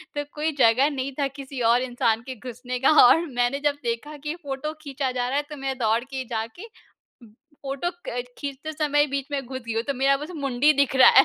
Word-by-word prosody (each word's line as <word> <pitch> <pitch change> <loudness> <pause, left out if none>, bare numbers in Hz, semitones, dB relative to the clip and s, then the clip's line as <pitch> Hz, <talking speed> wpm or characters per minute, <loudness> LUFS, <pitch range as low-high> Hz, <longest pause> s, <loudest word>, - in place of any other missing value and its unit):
तो 290 - -1
कोई 310 +1 0
जगह 250 +5 +5
नहीं 275 -1 -3
था 280 - +2
किसी 270 -1 -6
और 245 +1 +4
इंसान 235 -3 +1
के 260 - -4
घुसने 250 +1 -6
का 265 - +4 0.2
और 325 +7 +5
मैंने 245 +3 +1
जब 285 -1 +2
देखा 240 +6 -3
कि 300 +2 -3
फ़ोटो 280 +2 -4
खींचा 275 -2 -2
जा 250 -1 -1
रहा 275 - 0
है 290 - +1
तो 300 - -6
मैं 265 -1 -1
दौड़ 225 +1 +2
के 265 -1 -5
जाके 230 - -4 1.0
फ़ोटो 275 +5 -2 0.2
क 245 0 -2
खींचते 285 +2 -5
समय 295 -1 +2
बीच 275 -1 -1
में 275 -2 -2
घुस 260 +1 -6
गई 225 - -2
हूँ 225 - +1
तो 280 - 0
मेरा 275 +1 +3
बस 300 +4 -7
मुंडी 275 0 +3
दिख 280 -1 +2
रहा 260 - +9
है। 270 - +9
270 Hz, 225 wpm, -25 LUFS, 245-285 Hz, 1.0 s, रहा